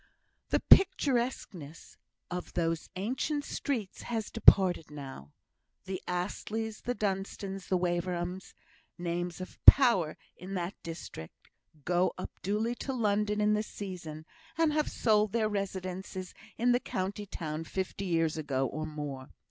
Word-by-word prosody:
The - - +2
picturesqueness 240 - +3 0.4
of 180 0 -5
those 165 -1 -1
ancient 265 +9 -1
streets 230 -9 -3
has 225 -3 -3
departed 190 -6 +5
now. 135 - -9 0.5
The 190 -1 -4
Astleys, 210 +5 -3
the 245 +1 -2
Dunstans, 195 -1 -3
the 185 - +2
Waverhams 175 +1 -2 0.4
names 175 0 -3
of 185 - -9
power 235 - +8 0.2
in 190 +2 -7
that 175 +1 -2
district 80 - -9 0.3
go 180 +1 +2
up 185 - -5
duly 215 +5 0
to 270 - -3
London 210 -3 +1
in 210 0 +3
the 210 - +2
season, 175 -7 -7 0.3
and 325 -2 +3
have 305 0 +1
sold 215 -2 +2
their 225 -2 +2
residences 190 -2 -4 0.2
in 245 +2 +3
the 245 - +4
county 200 -1 -3
town 160 -4 -4
fifty 190 +2 -3
years 165 -3 +1
ago, 135 -4 0
or 155 +4 -3
more. 145 -4 -6
185 Hz, 130 wpm, -31 LUFS, 170-210 Hz, 0.5 s, power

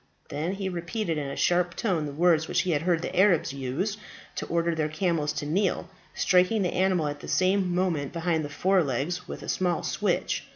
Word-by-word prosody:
Then 155 +6 -2
he 195 -1 -3
repeated 170 -1 -2
in 145 - -3
a 140 - -5
sharp 175 0 +1
tone 175 -9 0
the - - -5
words 160 +1 +3
which - - +1
he 185 - -1
had 145 -3 +1
heard 170 -1 +1
the - - -4
Arabs 185 -7 +3
use 140 +11 -2 0.4
to - - -4
order 170 0 +1
their 155 -1 -1
camels 155 -2 0
to - - -4
kneel, 185 +4 0 0.2
striking 185 +3 +3
the 180 - -1
animal 185 -3 +2
at 145 0 -4
the - - -9
same 185 -1 +2
moment 170 -7 0
behind 165 -1 0
the 145 - -5
fore 185 +5 +2
legs 155 +7 -2
with - - -7
a - - -8
small 180 -2 0
switch. - - -1
175 Hz, 210 wpm, -27 LUFS, 155-185 Hz, 0.4 s, words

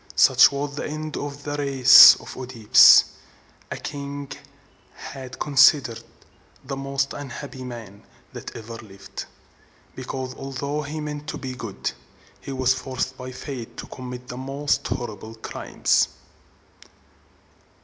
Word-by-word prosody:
Such - - +6
was 140 +1 -4
the - - -3
end 155 0 -6
of 145 0 -6
the 145 0 -4
race 135 -3 +8
of - - -11
OEdipus, 125 -4 +6 0.7
a - - -5
king 140 -1 -7
who - - -7 0.6
has 130 -1 -9
been 130 - -12
considered 140 -4 +4 0.6
the 135 +1 -5
most 135 0 -2
unhappy 140 -1 -8
man 115 -5 -9 0.3
that - - -9
ever 115 0 -8
lived, 100 -3 -10 0.7
because, 130 0 -6
although 140 +3 -4
he 150 +2 -6
meant 150 0 -6
to - - -5
be 130 -1 -6
good, 115 -6 -5 0.5
he - - -9
was 130 -1 +1
forced 130 0 -4
by 130 0 -8
fate 130 -2 -8
to - - -7
commit 125 -1 -9
the 125 - -8
most 140 +2 -2
horrible 115 -2 -6
crimes. 110 - 0
130 Hz, 135 wpm, -23 LUFS, 125-140 Hz, 0.7 s, race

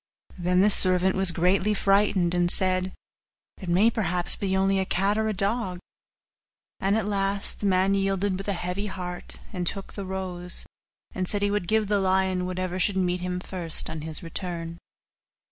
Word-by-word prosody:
Then 180 +1 +2
the 210 +2 +4
servant 185 -1 +3
was 190 -2 +5
greatly 185 +5 +1
frightened, 195 -3 +2
and 175 -1 +1
said, 185 0 +1 0.7
'It 185 - -7
may 195 +7 +4
perhaps 180 -5 +4
be 190 -1 -1
only 195 0 +2
a - - +1
cat 195 +3 0
or 220 0 0
a - - 0
dog.' 200 -1 -1 1.0
And 195 +3 +1
at 220 - -1
last 200 -1 -2
the 205 - -1
man 190 +1 +2
yielded 195 0 0
with 195 +2 -7
a 200 - 0
heavy 180 +3 -4
heart, 180 -2 -6
and 180 -2 -2
took 195 +2 -5
the 200 - -6
rose; 180 -2 -4 0.5
and 185 -1 -3
said 205 +1 -2
he 205 - +1
would 205 -4 -2
give 220 +1 +1
the 205 0 0
lion 190 -1 0
whatever 185 0 -3
should 195 +1 0
meet 180 -1 0
him 180 0 -3
first 175 -3 +4
on 160 - -6
his 160 +2 -6
return. 170 -1 -6
190 Hz, 180 wpm, -25 LUFS, 180-200 Hz, 1.0 s, was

